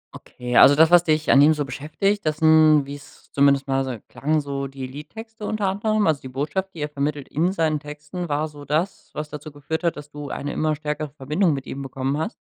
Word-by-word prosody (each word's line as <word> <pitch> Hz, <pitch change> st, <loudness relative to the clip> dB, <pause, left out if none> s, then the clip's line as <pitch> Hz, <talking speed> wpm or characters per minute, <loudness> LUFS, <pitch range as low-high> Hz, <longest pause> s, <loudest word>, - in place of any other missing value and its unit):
Okay, 125 Hz, 0 st, -6 dB
also, 145 Hz, -, +8 dB
das, 160 Hz, +2 st, +5 dB
was 175 Hz, -1 st, +7 dB
dich 155 Hz, -1 st, +1 dB
an 140 Hz, -, +7 dB
ihm 155 Hz, +2 st, +6 dB
so 145 Hz, -2 st, -2 dB
beschäftigt, 195 Hz, +9 st, -2 dB
das 155 Hz, -1 st, -1 dB
sind, 155 Hz, -2 st, +5 dB
wie's 145 Hz, +1 st, -12 dB
zumindest 140 Hz, 0 st, +3 dB
mal 135 Hz, 0 st, +1 dB
so 130 Hz, -3 st, -4 dB
klang, 155 Hz, +2 st, 0 dB
so 140 Hz, -1 st, -4 dB
die 135 Hz, -1 st, -7 dB
Liedtexte 220 Hz, -, -10 dB
unter 210 Hz, -1 st, -2 dB
anderem. 215 Hz, +2 st, 0 dB
Also, 155 Hz, -4 st, +1 dB
die 130 Hz, -, -8 dB
Botschaft, 150 Hz, +8 st, -3 dB
die 155 Hz, -, -7 dB
er 150 Hz, -, -2 dB
vermittelt 145 Hz, -1 st, -3 dB
in 170 Hz, +5 st, +1 dB
seinen 160 Hz, -5 st, 0 dB
Texten 150 Hz, +3 st, -7 dB
war 150 Hz, +2 st, 0 dB
so 145 Hz, -1 st, -12 dB
das, 155 Hz, +7 st, -2 dB
was 150 Hz, 0 st, -5 dB
dazu 150 Hz, +1 st, -8 dB
geführt 155 Hz, +4 st, -5 dB
hat, 170 Hz, -3 st, 0 dB
dass 150 Hz, 0 st, -10 dB
du 145 Hz, -1 st, -7 dB
eine 145 Hz, -, -4 dB
immer 155 Hz, -1 st, 0 dB
stärkere 150 Hz, 0 st, -4 dB
Verbindung 150 Hz, +5 st, 0 dB
mit 135 Hz, -1 st, -5 dB
ihm 140 Hz, -, -6 dB
bekommen 135 Hz, +1 st, -3 dB
hast? 185 Hz, +9 st, -3 dB
150 Hz, 225 wpm, -23 LUFS, 140-160 Hz, -, also